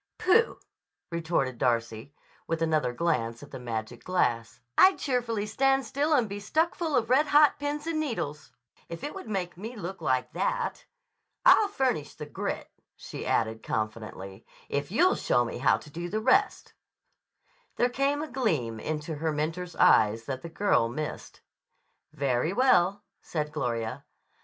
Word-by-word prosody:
"Pooh!" 445 Hz, +6 st, +3 dB, 0.5 s
retorted 160 Hz, -7 st, -1 dB
Darcy 115 Hz, +2 st, -1 dB, 0.3 s
with 165 Hz, 0 st, -1 dB
another 155 Hz, -5 st, +1 dB
glance 120 Hz, -5 st, -1 dB
at 145 Hz, -, -13 dB
the -, -, -7 dB
magic 115 Hz, -1 st, -5 dB
glass. 120 Hz, -11 st, 0 dB, 0.2 s
"I'd 380 Hz, 0 st, +6 dB
cheerfully 235 Hz, -6 st, -1 dB
stand 270 Hz, +5 st, +2 dB
still 290 Hz, +7 st, 0 dB
and 245 Hz, -6 st, +3 dB
be 200 Hz, 0 st, -5 dB
stuck 315 Hz, +11 st, +1 dB
full 320 Hz, -4 st, -2 dB
of 235 Hz, -1 st, +1 dB
red 295 Hz, +4 st, +4 dB
hot 295 Hz, 0 st, +5 dB
pins 290 Hz, +1 st, -3 dB
and 330 Hz, -1 st, -1 dB
needles, 155 Hz, -, -4 dB, 0.4 s
if 170 Hz, -1 st, -7 dB
it 295 Hz, -, -4 dB
would 385 Hz, -, -8 dB
make 180 Hz, -4 st, -3 dB
me 225 Hz, +6 st, -7 dB
look 190 Hz, -3 st, -6 dB
like 130 Hz, -4 st, 0 dB
that. -, -, -2 dB, 0.6 s
I'll 435 Hz, -4 st, +7 dB
furnish 255 Hz, -, -1 dB
the 150 Hz, -, -7 dB
grit," 145 Hz, -, -4 dB, 0.2 s
she -, -, -7 dB
added 110 Hz, -1 st, 0 dB
confidently, 110 Hz, -2 st, -5 dB, 0.3 s
"if 140 Hz, 0 st, -2 dB
you'll 350 Hz, -, +4 dB
show 120 Hz, -, +1 dB
me 115 Hz, -, -5 dB
how 130 Hz, -, +4 dB
to 150 Hz, -, -14 dB
do 170 Hz, +3 st, -5 dB
the 215 Hz, -, -1 dB
rest." 390 Hz, -, +2 dB, 1.0 s
There 245 Hz, -, +3 dB
came 275 Hz, +4 st, 0 dB
a -, -, -5 dB
gleam 160 Hz, -, -1 dB
into 155 Hz, +3 st, -4 dB
her 160 Hz, +1 st, -1 dB
mentor's 165 Hz, +4 st, -3 dB
eye 105 Hz, 0 st, +5 dB
that 130 Hz, -2 st, -4 dB
the 170 Hz, -, -7 dB
girl 165 Hz, -, +2 dB
missed. 150 Hz, +5 st, -6 dB, 0.7 s
"Very 140 Hz, +4 st, 0 dB
well," 205 Hz, -5 st, +3 dB, 0.2 s
said 150 Hz, -2 st, -3 dB
Gloria. 120 Hz, -2 st, -3 dB
170 Hz, 155 wpm, -28 LUFS, -, 1.0 s, I'll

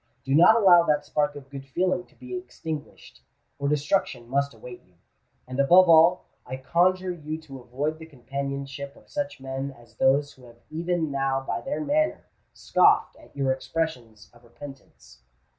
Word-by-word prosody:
Do 135 Hz, -, -1 dB
not 175 Hz, +9 st, +7 dB
allow 185 Hz, -6 st, +7 dB
that 150 Hz, -3 st, 0 dB
spark 145 Hz, 0 st, 0 dB
of 135 Hz, -1 st, -12 dB
good 135 Hz, -1 st, -7 dB
feeling 180 Hz, +6 st, -1 dB
to -, -, -27 dB
be 255 Hz, +9 st, -8 dB
extinguished—or 155 Hz, -, -8 dB
destruction 150 Hz, -4 st, 0 dB
must 140 Hz, +2 st, 0 dB
await 120 Hz, +2 st, -11 dB
you. 90 Hz, -1 st, -31 dB, 0.5 s
And 130 Hz, +1 st, -6 dB
above 180 Hz, +7 st, +6 dB
all, 170 Hz, +2 st, +5 dB, 0.2 s
I 130 Hz, +1 st, -6 dB
conjure 180 Hz, +7 st, +1 dB
you 155 Hz, -2 st, -6 dB
to 135 Hz, -4 st, -11 dB
avoid 140 Hz, +6 st, -4 dB
the 160 Hz, -, -10 dB
companionship 140 Hz, 0 st, -6 dB
of -, -, -21 dB
such 290 Hz, -, -4 dB
men 135 Hz, +1 st, -4 dB
as 120 Hz, -4 st, -17 dB
those 140 Hz, +2 st, +2 dB
who 130 Hz, -, -18 dB
have 120 Hz, -1 st, -16 dB
even 165 Hz, -1 st, -1 dB
now 135 Hz, -1 st, 0 dB
by 135 Hz, -, -4 dB
their 275 Hz, +2 st, -3 dB
manner 310 Hz, +2 st, 0 dB, 0.3 s
scoffed -, -, +3 dB
at -, -, -19 dB
your 135 Hz, -2 st, +1 dB
expressions 130 Hz, -6 st, -4 dB
of 120 Hz, 0 st, -21 dB
repentance." 135 Hz, -, -14 dB
140 Hz, 165 wpm, -25 LUFS, 135-170 Hz, 0.5 s, not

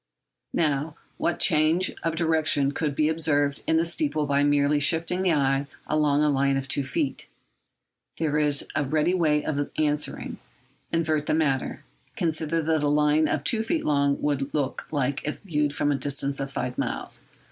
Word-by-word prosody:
Now, 150 Hz, -1 st, 0 dB, 0.2 s
what 175 Hz, -, 0 dB
change 160 Hz, +2 st, +3 dB
of 165 Hz, -1 st, -1 dB
direction 155 Hz, -4 st, +2 dB
could 145 Hz, -1 st, -2 dB
be 150 Hz, +1 st, +2 dB
observed 145 Hz, -3 st, +1 dB
in 160 Hz, -, +3 dB
the 165 Hz, -, +2 dB
steeple 170 Hz, -, -1 dB
by 140 Hz, 0 st, +2 dB
merely 145 Hz, 0 st, +3 dB
shifting 165 Hz, +4 st, +2 dB
the 185 Hz, -3 st, +2 dB
eye 135 Hz, -1 st, +1 dB, 0.2 s
along 150 Hz, -1 st, +2 dB
a 150 Hz, -, +3 dB
line 140 Hz, 0 st, +2 dB
of 135 Hz, 0 st, -3 dB
two 140 Hz, 0 st, +1 dB
feet? 135 Hz, 0 st, -3 dB, 0.9 s
There 150 Hz, -2 st, 0 dB
is 145 Hz, -2 st, +2 dB
a -, -, +1 dB
ready 155 Hz, +5 st, +1 dB
way 155 Hz, -5 st, +1 dB
of 145 Hz, -1 st, -2 dB
answering. 150 Hz, -1 st, -1 dB, 0.5 s
Invert 155 Hz, -3 st, 0 dB
the -, -, +2 dB
matter. 140 Hz, -4 st, -1 dB, 0.3 s
Consider 160 Hz, 0 st, -1 dB
what 160 Hz, -1 st, +1 dB
a -, -, +2 dB
line 150 Hz, +1 st, +3 dB
of -, -, -1 dB
two 225 Hz, -3 st, +2 dB
feet 280 Hz, +9 st, -1 dB
long 140 Hz, -1 st, +2 dB
would 140 Hz, -1 st, -1 dB
look 145 Hz, -3 st, -2 dB
like 140 Hz, -2 st, -1 dB
if 150 Hz, -, -4 dB
viewed 150 Hz, -7 st, 0 dB
from 145 Hz, 0 st, 0 dB
a 140 Hz, -, +1 dB
distance 140 Hz, +1 st, -2 dB
of 135 Hz, 0 st, -4 dB
five 125 Hz, -2 st, -4 dB
miles. -, -, -3 dB
150 Hz, 175 wpm, -25 LUFS, 140-160 Hz, 0.9 s, change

